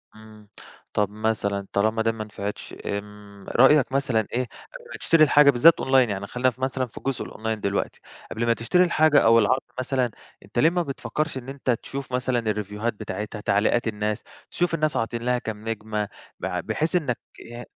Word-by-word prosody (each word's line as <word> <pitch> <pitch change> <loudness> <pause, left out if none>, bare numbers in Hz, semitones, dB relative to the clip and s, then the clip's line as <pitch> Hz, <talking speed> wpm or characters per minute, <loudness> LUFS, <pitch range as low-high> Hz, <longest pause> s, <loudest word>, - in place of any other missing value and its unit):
امم، 110 -1 -15 0.5
طب 105 -1 +1
مثلًا 105 -2 -2
طالما 110 +2 +2
ده 115 0 +2
ما 110 -1 -5
نفعتش، 105 -1 -6
آمم، 100 0 -7
رأيك 150 -4 +5
مثلًا، 130 -6 +1
إيه، 125 +2 +1
قبل 485 - -13
ما - - -6
تشتري 165 -1 +4
الحاجة 145 -1 +6
بالذات 150 +6 +6
online، 130 -2 +4
يعني، 100 0 -3
خلينا 125 +3 +1
ف 125 0 -13
مثلًا 130 0 -1
في 115 - -18
الجزء 135 -2 -3
الonline 110 - -8
دلوقتي، 100 -1 -2 0.3
قبل 115 +1 -1
ما 115 - +4
تشتري 115 +11 +2
الحاجة 155 -4 +4
أو 115 -2 +6
العرض 130 +5 +2 0.2
مثلًا، 130 -2 0 0.3
أنتَ - - -3
ليه 160 - +6
ما 175 +1 0
بتفكّرش 150 +1 -3
إن 130 0 -7
أنتَ 135 -1 -5
تشوف 135 +3 -5
مثلًا 125 -1 +1
الريفيوهات 105 0 -2
بتاعتها، 105 0 -6
تعليقات 105 +4 +2
الناس، 105 -1 -2 0.3
تشوف 175 -1 0
الناس 155 -2 0
عاطين 115 +1 -2
لها 125 0 +1
كام 110 -2 -6
نجمة، 105 -1 -3 0.3
بع 90 -1 -2
بحيث 155 - -1
إنك، 140 -9 0 0.3
إي 120 +1 -9
115 Hz, 180 wpm, -24 LUFS, 105-135 Hz, 0.5 s, الحاجة